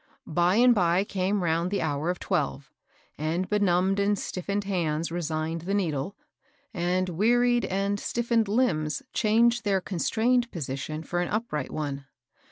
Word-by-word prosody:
By 175 +3 +2
and 245 +2 +6
by 180 -2 +2
came 195 0 -1
round 170 +1 +1
the 200 -2 -1
hour 150 +1 -1
of 180 - -1
twelve, 140 -2 -2 0.5
and 165 +4 -1
benumbed 195 -1 +2
and 205 +1 +2
stiffened 200 +3 -3
hands 165 -5 -1
resigned 165 -1 -2
the 195 +4 -2
needle, 165 -2 -1 0.6
and 180 0 0
wearied 240 +7 +2
and 200 +1 -1
stiffened 235 -1 0
limbs 200 - 0
changed 235 +2 +3
their 200 -2 +2
con 180 -1 -5
strained 240 +5 +2
position 155 0 -4
for 175 +2 -2
an 175 - -1
upright 210 - -2
one. 140 -2 -4
185 Hz, 150 wpm, -27 LUFS, 160-210 Hz, 0.6 s, and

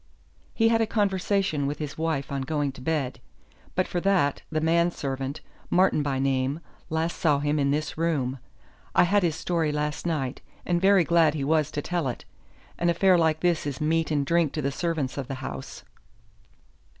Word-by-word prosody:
"He 225 0 +4
had 225 0 +3
a 225 - +1
conversation 195 -7 0
with 145 +1 -3
his 150 -2 -5
wife 160 -4 -2
on 140 -1 -2
going 145 +1 -1
to 130 - -13
bed. 140 -2 -1 0.6
But 185 - +1
for 175 - -2
that, 180 -8 +2
the 155 - 0
man 170 +2 +3
servant, 135 -3 -4 0.3
Martin 185 -3 +3
by 140 -2 -1
name, 135 +2 0 0.3
last 160 +2 -1
saw 150 -4 +3
him 145 +1 0
in 140 -1 +2
this 150 +2 -2
room. 140 -6 0 0.6
I - - +6
had 200 +3 +3
his 170 -4 +1
story 165 -3 0
last 150 +2 -2
night, 135 -6 -2 0.2
and 175 -1 +1
very 195 -1 +5
glad 165 -2 +3
he 145 - -2
was 155 +1 +2
to 145 -1 -4
tell 175 -5 -1
it. 125 - -5 0.5
An 175 - +2
affair 185 +2 +4
like 160 -2 +2
this 170 -4 +1
is 140 -2 -4
meat 160 +1 +1
and 145 -2 +1
drink 170 0 +2
to 155 - -2
the 140 - 0
servants 150 -3 -2
of 135 - -4
the 135 - -4
house." 70 - -7
155 Hz, 190 wpm, -26 LUFS, 140-170 Hz, 0.6 s, I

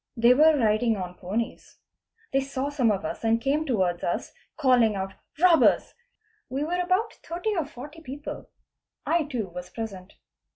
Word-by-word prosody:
They 235 +2 +6
were 310 +3 +6
riding 220 -1 +2
on 180 -2 -5
ponies. 195 +6 -4 0.6
They 270 - +4
saw, 275 0 -3
some 270 -6 +2
of 195 -1 -2
us - - -5
and 225 0 +3
came 290 +5 0
towards 185 -8 0
us 175 - -2 0.2
calling 250 -7 +4
out 195 0 -3 0.2
'' - - -26
robbers'; 345 -3 +5 0.6
we 270 +3 -2
were 350 +4 -1
about 370 +5 +1
30 355 +6 -2
or 325 -6 -1
40 295 +3 -10
people. 290 0 -7 0.6
I 335 -2 +2
too 245 -8 -3
was 180 +1 -8
present. 200 -5 -7
255 Hz, 165 wpm, -26 LUFS, 215-305 Hz, 0.6 s, They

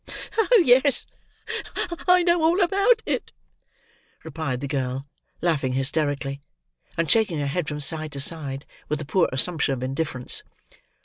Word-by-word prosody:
"Oh, 450 -2 +5
yes, 260 +2 +4 1.0
I 360 0 +6
know 345 -1 +3
all 330 +4 +3
about 395 +6 +3
it," - - -2 0.9
replied 155 -5 -3
the 140 - -4
girl, 135 -1 -2 0.4
laughing 145 -7 0
hysterically; 140 0 -1 0.6
and 165 0 +1
shaking 200 0 +2
her 145 - -1
head 150 +3 -2
from 150 0 -4
side 155 +1 0
to 140 - -5
side, 140 -2 -1 0.2
with 150 - -1
a - - -5
poor 170 +4 +2
assumption 140 +1 +1
of 125 - -6
indifference. 130 -1 0
155 Hz, 140 wpm, -24 LUFS, 140-225 Hz, 1.0 s, I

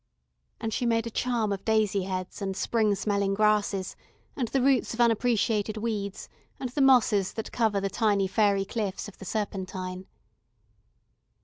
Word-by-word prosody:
And 225 -1 -3
she 245 - 0
made 230 -1 +1
a 230 - -5
charm 235 -3 0
of 195 -1 -3
daisy 215 -3 +1
heads, 185 +1 -5
and 195 -1 -3
spring 215 -3 +1
smelling 200 0 0
grasses, 210 -2 +1 0.4
and 250 -4 -1
the 270 - 0
roots 260 -3 +2
of - - -13
unappreciated 225 -2 +2
weeds, 210 -3 -3 0.3
and 255 -2 -4
the 280 - -1
mosses 240 -7 +4
that 220 - -5
cover 220 -4 +1
the 195 - -1
tiny 200 -1 +1
faery 200 0 +2
cliffs 205 -2 -3
of 210 - -13
the 195 - -9
Serpentine. 185 -3 -4
210 Hz, 155 wpm, -27 LUFS, 195-230 Hz, 0.4 s, mosses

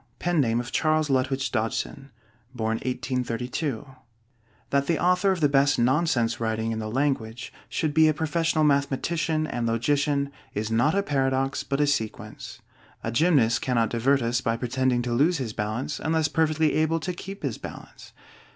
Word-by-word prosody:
LEWIS 175 -3 +3
CARROLL 120 -1 +1
(CHARLES 155 -1 +1
LUTWIDGE 135 +1 0
DODGSON) 115 +5 -2 0.4
(1832 125 +2 -2 0.4
) 115 -3 -37
That 140 0 +1
the 170 - +2
author 180 +2 +3
of 185 -3 -2
the 145 - +5
best 140 0 +3
nonsense 120 -2 +1
writing 110 0 -1
in 110 - -3
the 110 0 -4
language 125 -2 -2 0.2
should 155 -2 -1
be 160 +1 +5
a 155 - +3
professional 160 0 0
mathematician 155 +3 +1
and 120 -6 -2
logician, 140 +4 +1 0.2
is 110 +1 -2
not 120 +10 +2
a 200 - +2
paradox 135 -4 0
but 140 +1 -2
a 145 - +4
sequence. 125 -7 -4 0.4
A 115 - -2
gymnast 125 -3 +3
cannot 115 -4 +1
divert 130 +3 +2
us 120 +1 0
by 115 0 0
pretending 125 0 0
to 120 -1 -2
lose 155 +8 +3
his 120 -6 -4
balance 110 +8 -3
unless 160 -1 +1
perfectly 155 0 +1
able 160 +1 +2
to 180 +2 -3
keep 195 +3 -9
his - - -3
balance. - - -10
135 Hz, 160 wpm, -25 LUFS, 115-155 Hz, 0.4 s, the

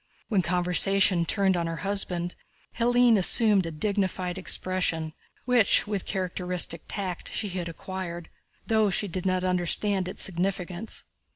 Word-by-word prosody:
When 205 -5 +2
conversation 180 +1 +3
turned 195 -1 +1
on 170 -1 -1
her 165 - -3
husband 180 -3 -1 0.4
Hélène 240 -1 +4
assumed 200 -1 +4
a - - -5
dignified 185 +1 -2
expression, 180 -4 0 0.3
which 245 -4 +3
with 205 -2 -4
characteristic 180 -3 -1
tact 190 -3 -5
she 210 - -1
had 175 -2 -4
acquired 175 0 -7 0.3
though 220 -2 +2
she 200 +2 0
did 185 +1 -4
not 185 0 0
understand 185 +2 0
its 185 - -1
significance. 185 +2 -2
185 Hz, 130 wpm, -26 LUFS, 175-200 Hz, 0.4 s, Hélène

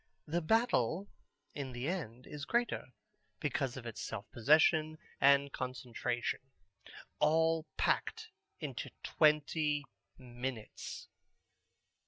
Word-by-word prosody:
The 170 +3 0
Battle 195 - +2 0.4
in 135 -3 -5
the 120 +3 -3
end 130 - -3
is 150 -1 -7
greater, 240 +8 0 0.5
because 135 -3 -1
of 125 - -7
its 115 -2 -5
self 100 - -4
possession 155 +5 +4 0.2
and 140 0 +5
concentration: 125 -1 -2 0.8
all 160 0 +3
packed - - 0 0.3
into - - -4
twenty 150 -1 +3 0.3
minutes. 120 -2 -6
145 Hz, 95 wpm, -34 LUFS, 125-160 Hz, 0.8 s, and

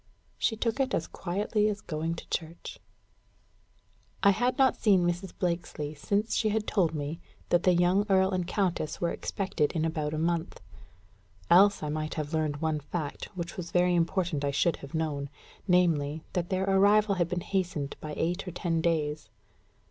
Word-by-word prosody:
She 225 - +1
took 230 +3 -1
it 265 -1 +1
as 160 - -1
quietly 210 +4 -1
as 210 0 -3
going 160 0 -3
to - - -10
church. 165 0 -5 1.4
I 200 - +7
had 245 +7 0
not 265 -2 +4
seen 190 -5 +3
Mrs. 175 +1 -2
Blakesley 170 -4 -2
since 200 +9 -1
she 220 - +2
had 215 0 0
told 170 -6 +1
me 150 +3 -4 0.3
that 175 - +4
the 180 -1 +4
young 180 +4 +3
earl 190 0 +4
and 180 -2 -1
countess 180 -6 -1
were 170 - 0
expected 185 -6 -1
in 160 -1 0
about 155 -2 -2
a - - -3
month; 170 +1 -1 0.9
else 200 +2 +6
I 150 - -2
might 155 +1 -3
have 155 0 -4
learned 155 -2 0
one 160 -1 0
fact 150 0 -5
which 170 -1 -3
it - - -15
was 175 -2 -5
very 180 +1 +3
important 170 -3 0
I 140 - +1
should 160 +4 +1
have 140 +2 -9
known, 145 -3 -2 0.4
namely, 160 -4 +2
that 175 -1 -1
their 190 0 0
arrival 200 +2 +4
had 170 - +1
been 180 -1 -2
hastened 175 -7 -2
by 150 -1 -5
eight 175 +4 -1
or - - -3
ten 165 -1 -1
days. 155 -3 -1
175 Hz, 180 wpm, -29 LUFS, 155-190 Hz, 1.4 s, I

